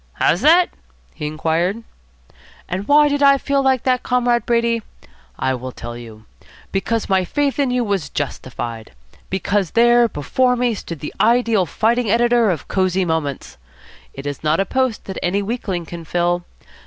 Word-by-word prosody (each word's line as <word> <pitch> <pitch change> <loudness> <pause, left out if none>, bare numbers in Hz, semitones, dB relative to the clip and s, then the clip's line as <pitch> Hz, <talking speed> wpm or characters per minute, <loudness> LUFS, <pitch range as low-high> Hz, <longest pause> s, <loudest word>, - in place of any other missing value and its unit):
"How's 175 - +1
that?" 345 +4 +5 0.4
he 150 - -5
inquired. 165 +7 -1 0.8
"And 190 +4 -4
why 295 +1 +6
did 285 0 -1
I 275 -1 +6
feel 280 0 0
like 265 -2 +2
that, 255 -1 +1
Comrade 245 -1 +1
Brady? 235 -1 +1 0.6
I 130 - 0
will 130 0 -5
tell 120 -1 -8
you. 110 -2 -11 0.5
Because 220 +3 -1
my 190 -1 +2
faith 285 +9 -1
in 275 -2 +2
you 250 0 +1
was 195 -9 -2
justified. 120 -5 -5 0.4
Because 190 0 0
there 240 0 +5
before 250 - +1
me 245 -1 +1
stood 170 -7 -7
the 150 - -6
ideal 230 -5 +3
fighting 230 +7 +1
editor 235 0 +3
of 165 -7 -3
Cosy 185 -1 +1
Moments. 155 - -3 0.5
It 135 - -9
is 145 +1 -5
not 155 +2 +2
a 195 - +2
post 260 0 -1
that 190 - -5
any 195 +3 0
weakling 195 -6 -3
can 170 0 -8
fill. 175 +1 0
200 Hz, 165 wpm, -19 LUFS, 160-245 Hz, 0.8 s, why